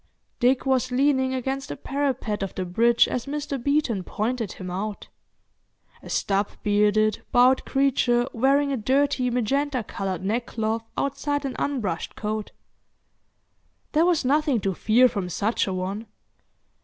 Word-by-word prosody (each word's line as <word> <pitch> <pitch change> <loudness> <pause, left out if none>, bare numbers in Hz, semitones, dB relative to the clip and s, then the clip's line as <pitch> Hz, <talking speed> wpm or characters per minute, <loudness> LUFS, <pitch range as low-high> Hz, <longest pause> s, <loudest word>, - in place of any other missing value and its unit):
Dick 250 +2 +2
was 260 -1 +1
leaning 265 0 +2
against 265 +2 -3
the - - -4
parapet 265 -7 -2
of 195 - -4
the 185 - -2
bridge 235 +6 +3
as 250 +1 -3
Mr. 285 -3 -4
Beeton 280 -9 +1
pointed 225 +2 -2
him 185 -1 -7
out—a 205 +3 -10
stub 200 0 0
bearded, 210 +1 +2
bowed 250 +2 +4
creature 255 -3 +2
wearing 275 +4 +2
a 270 - 0
dirty 260 +2 +1
magenta 255 +2 0
coloured 190 -3 -4
neckcloth 225 0 -1 0.2
outside 285 +1 -1
an 265 - -3
unbrushed 230 -12 -2
coat. 215 0 -3 1.4
There 320 +3 +3
was 335 -6 +2
nothing 290 -2 +2
to 195 0 0
fear 230 +7 +4
from 200 -6 -3
such 210 +6 0
an 185 -1 -2
one. 195 +5 -4
245 Hz, 135 wpm, -25 LUFS, 210-275 Hz, 1.4 s, bowed